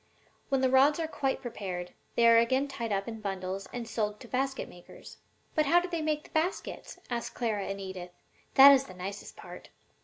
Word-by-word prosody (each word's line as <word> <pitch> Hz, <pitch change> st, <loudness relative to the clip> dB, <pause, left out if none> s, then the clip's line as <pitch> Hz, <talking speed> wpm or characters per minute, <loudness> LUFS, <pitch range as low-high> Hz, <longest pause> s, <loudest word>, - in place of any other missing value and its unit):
When 270 Hz, -2 st, +1 dB
the 260 Hz, -, +3 dB
rods 280 Hz, +4 st, +5 dB
are 325 Hz, -, -1 dB
quite 270 Hz, -4 st, -2 dB
prepared, 185 Hz, -7 st, -5 dB, 0.2 s
they 235 Hz, -, +5 dB
are 230 Hz, 0 st, +7 dB
again 260 Hz, +4 st, +2 dB
tied 240 Hz, -5 st, -5 dB
up 195 Hz, -1 st, -1 dB
in 225 Hz, -1 st, -6 dB
bundles 190 Hz, -1 st, -4 dB
and 240 Hz, -2 st, -5 dB
sold 210 Hz, -2 st, -2 dB
to 245 Hz, -, -10 dB
the -, -, -24 dB
basket 270 Hz, +1 st, -1 dB
makers.'" 175 Hz, -, -14 dB, 0.4 s
"But 310 Hz, -2 st, +2 dB
how 345 Hz, +4 st, +6 dB
do 355 Hz, -, -4 dB
they 340 Hz, -2 st, -3 dB
make 305 Hz, -1 st, -1 dB
the -, -, -16 dB
baskets?" 330 Hz, +5 st, -2 dB
asked 235 Hz, -1 st, -3 dB
Clara 215 Hz, -5 st, -1 dB
and 195 Hz, 0 st, -4 dB
Edith. 190 Hz, -2 st, -7 dB, 0.5 s
"That 275 Hz, +1 st, +11 dB
is 270 Hz, -1 st, +4 dB
the 185 Hz, -, -12 dB
nicest 195 Hz, +3 st, -7 dB
part." -, -, -11 dB
235 Hz, 210 wpm, -29 LUFS, 195-275 Hz, 0.5 s, That